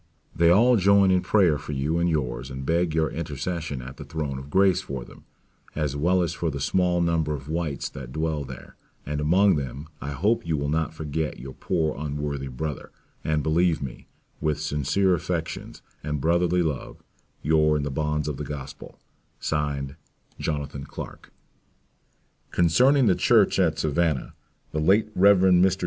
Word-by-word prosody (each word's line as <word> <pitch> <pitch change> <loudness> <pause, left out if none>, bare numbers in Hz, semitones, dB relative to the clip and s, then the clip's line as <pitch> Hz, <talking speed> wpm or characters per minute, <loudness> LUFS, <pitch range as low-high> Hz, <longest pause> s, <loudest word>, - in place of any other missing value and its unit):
They 85 0 +4
all 115 +7 +5
join 100 0 +5
in 90 -1 +3
prayers 90 -10 +3
for 75 - -6
you 75 +5 0
and 85 0 +2
yours 65 -5 -2
and 65 0 -6
beg 85 +1 +1
your 80 -1 +1
intercession 80 -2 -4
at 65 +1 -9
the - - -7
throne 75 -4 -4
of 70 +2 -10
grace 95 +1 +3
for 65 -3 -6
them, - - -16 0.5
as 75 -3 -1
well 90 +5 +2
as 85 - -2
for 85 -1 -2
the 70 -2 -4
small 90 +4 +1
number 80 -3 +1
of 70 -1 -9
whites 80 -3 -2
that 65 -2 -9
dwell 80 0 -1
here; 65 0 -11 0.3
and 75 +1 -3
among 90 +4 +4
them 70 +2 -5
I 70 - -4
hope 105 - +1
you 80 -2 0
will 70 0 -2
not 80 +1 -1
forget 80 0 -3
your 65 +2 -8
poor 80 -1 -1
unworthy 70 -1 -3
brother, 70 +3 -5 0.3
and 75 -1 0
believe 85 +1 +2
me, 65 -3 -7 0.3
with 75 -1 0
sincere 75 +6 +1
affections 85 - -4 0.2
and 75 0 -2
brotherly 85 +3 +2
love, 75 -6 -4 0.4
your 75 0 +3
in 75 - -2
the 70 - -3
bonds 75 +1 -1
of 75 -3 -3
the 75 - -4
Gospel, 70 -2 -8 0.4
(Signed) 70 -2 -2 0.4
Jonathan 70 -2 -3
Clarke - - -9 1.2
Concerning 125 - +4
the 100 - +5
church - - +3
at - - +2
Savannah, 80 -2 0 0.4
the 75 - -2
late 100 +7 +3
Rev. 100 +1 +6
Mr. 95 0 +4
75 Hz, 170 wpm, -25 LUFS, 70-85 Hz, 1.2 s, Rev